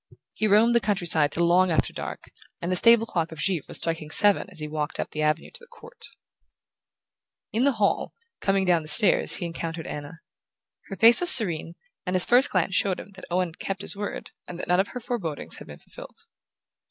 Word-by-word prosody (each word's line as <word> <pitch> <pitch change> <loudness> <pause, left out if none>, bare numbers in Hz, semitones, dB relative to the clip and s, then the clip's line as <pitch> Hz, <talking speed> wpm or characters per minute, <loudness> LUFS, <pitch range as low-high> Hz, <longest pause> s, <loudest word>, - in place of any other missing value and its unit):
He 215 - -1
roamed 215 +4 +3
the 235 - +4
country 200 -4 -2
side 155 -3 +1
till 170 +3 -1
long 180 +2 +3
after 160 - -1
dark, - - -8 0.3
and 175 - -4
the - - 0
stable 230 +4 +4
clock 170 -7 -3
of 160 - -10
Givre 170 0 -2
was - - -3
striking 165 -2 -5
seven 205 +3 +4
as 185 -4 -10
he 150 - -5
walked 150 0 -5
up - - -4
the 155 - -5
avenue 155 +1 -1
to - - -8
the 480 - -18
court. 475 +2 -15 1.5
In 235 +4 +1
the 280 - +2
hall, 210 -3 -1 0.2
coming 195 -1 0
down 175 -2 +2
the 155 - -12
stairs, 175 +5 +4
he - - -6
encountered 165 -1 -6
Anna. 145 +1 -8 0.7
Her 195 - -7
face 230 +4 +6
was 350 - +7
serene, 170 - +6 0.3
and 180 0 -3
his 180 - +3
first 255 +4 +3
glance 185 0 -1
showed 185 0 0
him 200 - -12
that 190 -1 -13
Owen 180 0 -1
had 160 - -19
kept 195 0 -5
his - - -1
word 205 +1 -7 0.2
and 175 - -9
that - - -7
none 180 +1 +1
of 195 - +1
her 250 - -8
forebodings 215 - -5
had - - -12
been - - -11
fulfilled. - - -15
185 Hz, 220 wpm, -24 LUFS, 165-210 Hz, 1.5 s, was